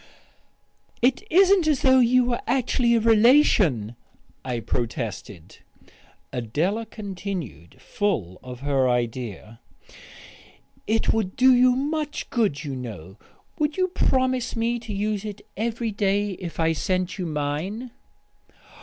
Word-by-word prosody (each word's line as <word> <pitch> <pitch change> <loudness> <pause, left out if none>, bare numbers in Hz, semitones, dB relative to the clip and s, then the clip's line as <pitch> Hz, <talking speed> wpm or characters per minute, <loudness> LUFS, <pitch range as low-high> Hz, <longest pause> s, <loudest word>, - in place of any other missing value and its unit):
"It 255 +1 +3
isn't 375 0 +5
as 300 -4 +1
though 260 -1 +6
you 250 +1 +4
were 240 -1 -1
actually 245 -2 +2
a - - +3
relation," 215 - +4 0.5
I 125 -2 -3
protested. 110 -7 -5 0.7
Adela 160 - -1
continued, 190 - -7
full 115 - -2
of 125 -1 -10
her 135 -2 +1
idea. 115 -2 -3 1.3
"It 225 +1 +1
would 210 -4 -2
do 260 +1 +6
you 250 0 +5
so 260 +2 -1
much 300 0 -3
good, 210 - 0
you 140 -3 -4
know. 105 -7 -8 0.4
Would 300 +1 0
you 370 0 +1
promise 255 -7 0
me 235 +1 0
to 225 -2 -9
use 205 0 -2
it 210 -2 -7
every 230 +1 -2
day 205 0 0
if 180 -3 -7
I 165 0 +2
sent 185 +4 -2
you 180 - -2
mine?" 160 - -3
205 Hz, 125 wpm, -24 LUFS, -, 1.3 s, though